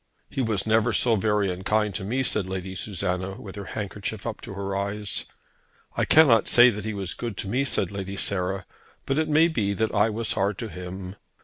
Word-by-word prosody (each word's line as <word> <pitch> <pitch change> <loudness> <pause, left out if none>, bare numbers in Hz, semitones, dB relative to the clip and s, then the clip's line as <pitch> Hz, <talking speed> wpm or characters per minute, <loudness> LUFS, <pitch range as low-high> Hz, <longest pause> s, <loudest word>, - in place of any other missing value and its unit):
"He 140 - -1
was 110 -5 0
never 110 +1 +3
so 115 +1 +4
very 105 -1 +1
unkind 105 +3 0
to 95 - -3
me," 125 +7 0
said 105 -6 0
Lady 95 0 -4
Susanna, 95 -1 -3
with 95 -3 -9
her 100 -1 -6
handkerchief 100 0 -4
up 115 -2 -4
to 100 - -8
her 100 0 -3
eyes. 100 +1 -2 0.7
"I - - +1
cannot 135 -9 +6
say 120 +1 +7
that 105 -1 -6
he 110 - -2
was 95 -2 -3
good 115 -4 -5
to - - -3
me," 130 +7 +1
said 95 -7 0
Lady 100 -1 -5
Sarah, 95 0 0 0.4
"but 135 +3 +1
it 160 - 0
may 155 +2 +5
be 105 -11 0
that 110 +3 0
I 105 +2 +4
was 110 +1 -2
hard 100 +1 0
to 115 - -5
him. 90 +1 -7
100 Hz, 210 wpm, -25 LUFS, 95-110 Hz, 0.7 s, say